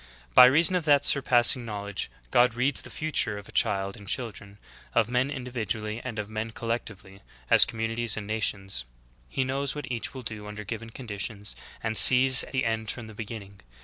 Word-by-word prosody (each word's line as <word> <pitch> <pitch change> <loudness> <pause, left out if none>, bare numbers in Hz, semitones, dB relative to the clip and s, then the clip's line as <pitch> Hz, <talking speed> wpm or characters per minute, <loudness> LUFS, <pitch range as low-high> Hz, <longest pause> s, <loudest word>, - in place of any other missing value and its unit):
By 125 - +9
reason 160 +8 +4
of 175 -4 -2
that 145 -2 +3
surpassing 125 -2 +4
knowledge, 100 - -5 0.2
God 120 -1 +3
reads 130 +3 -1
the - - -9
future 155 -9 -2
of 100 - -12
child 95 0 0
and 100 -1 -13
children, 100 -4 -5 0.4
of 115 0 +1
men 125 +2 0
individually 115 -4 -5
and 120 -4 -7
of 105 -1 -4
men 110 +1 -5
collect 115 +1 -4
ively 95 -1 -16 0.3
as - - +8
communities 115 0 -2
and 105 - -5
nations; 100 - -3 0.4
He 135 - -2
knows 135 +2 -3
what 145 -3 -7
each 120 +2 -5
will 130 - -8
do 105 -2 -7
under 105 0 -8
given 115 +2 -7
conditions, 105 -3 -6 0.3
and 110 -1 -3
sees 130 +2 +9
the 130 -2 -1
end 110 -1 -3
from 120 +1 -7
the 110 - -12
be 110 +1 -7
ginning. 100 -3 -10
115 Hz, 185 wpm, -26 LUFS, 105-125 Hz, 0.4 s, By